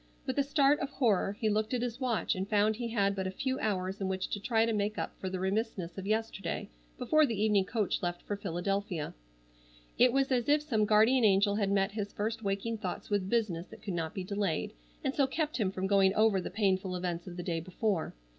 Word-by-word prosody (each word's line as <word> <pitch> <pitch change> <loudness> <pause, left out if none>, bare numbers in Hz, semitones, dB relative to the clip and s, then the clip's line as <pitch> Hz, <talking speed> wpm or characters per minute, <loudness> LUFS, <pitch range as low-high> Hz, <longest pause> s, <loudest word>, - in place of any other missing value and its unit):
With 260 +1 -1
a - - +4
start 280 0 +3
of 275 - -2
horror 210 -7 +1
he 220 - +1
looked 215 +3 +1
at 245 - -1
his 245 0 -3
watch 245 -4 +1
and 190 +1 -4
found 215 +1 +3
he 235 +1 -3
had 200 -4 +1
but 190 -1 -2
a - - -1
few 260 +7 -2
hours 195 -2 -2
in 190 - 0
which 190 0 -2
to 205 - -2
try 225 +2 +2
to 230 - 0
make 210 0 -1
up - - -3
for 190 - -3
the 185 0 -3
remissness 190 -2 -2
of 195 0 -6
yesterday 215 - -2 0.3
before 310 0 +3
the 230 -8 0
evening 210 -2 +3
coach 215 -1 -1
left 175 -1 -3
for 205 - -3
Philadelphia. 195 -2 -2 0.9
It 250 0 +6
was 270 +1 +1
as 245 0 +1
if 295 +1 +4
some 225 -8 +1
guardian 220 +4 +4
angel 200 0 +4
had 200 -2 +1
met 195 0 +2
his 205 -1 -4
first 220 +2 -2
waking 205 +2 -2
thoughts 190 0 -5
with 195 -2 0
business 195 -7 0
that - - -14
could 195 - -3
not 165 -2 -3
be 190 - -3
delayed 195 - -2 0.3
and 270 - 0
so 275 -2 +2
kept 305 +2 -2
him 210 -6 +1
from 190 0 -3
going 195 -1 +4
over 215 -3 +4
the - - -5
painful 190 -2 0
events 175 -1 -3
of 175 -1 -8
the 175 - -4
day 170 -2 -1
before. 185 - -2
205 Hz, 230 wpm, -31 LUFS, 190-230 Hz, 0.9 s, It